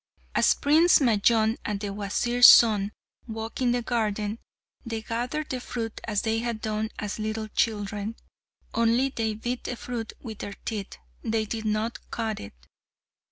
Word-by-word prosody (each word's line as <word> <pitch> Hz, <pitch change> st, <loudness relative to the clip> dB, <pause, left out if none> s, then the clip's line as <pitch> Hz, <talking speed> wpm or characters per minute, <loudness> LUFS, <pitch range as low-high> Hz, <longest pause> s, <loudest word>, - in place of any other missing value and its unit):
As -, -, +4 dB
Prince 320 Hz, +5 st, +5 dB
Majnun 225 Hz, -2 st, +3 dB
and 210 Hz, -1 st, -2 dB
the 200 Hz, -1 st, -4 dB
Wazir's 240 Hz, +4 st, +4 dB
son 210 Hz, -3 st, +6 dB, 0.4 s
walked 225 Hz, +2 st, -5 dB
in 245 Hz, -1 st, +3 dB
the 245 Hz, 0 st, 0 dB
garden, 215 Hz, -2 st, -1 dB, 0.4 s
they 225 Hz, -2 st, -4 dB
gathered 245 Hz, +7 st, -3 dB
the 255 Hz, -, -2 dB
fruit 225 Hz, -3 st, -5 dB
as 210 Hz, -2 st, -1 dB
they 225 Hz, 0 st, +1 dB
had 235 Hz, -1 st, -3 dB
done 215 Hz, 0 st, -2 dB
as 210 Hz, 0 st, -4 dB
little 215 Hz, 0 st, -3 dB
children, 205 Hz, 0 st, -1 dB, 0.6 s
only 230 Hz, +4 st, +3 dB
they 220 Hz, -4 st, -2 dB
bit 240 Hz, +3 st, -4 dB
the 245 Hz, -, -3 dB
fruit 235 Hz, -1 st, -5 dB
with 220 Hz, -4 st, -8 dB
their 200 Hz, -, -6 dB
teeth; 210 Hz, -4 st, -4 dB, 0.2 s
they 220 Hz, 0 st, 0 dB
did 220 Hz, +1 st, -4 dB
not 215 Hz, +2 st, -1 dB
cut 220 Hz, -2 st, -3 dB
it. 100 Hz, -, -9 dB
225 Hz, 160 wpm, -26 LUFS, 215-235 Hz, 0.6 s, son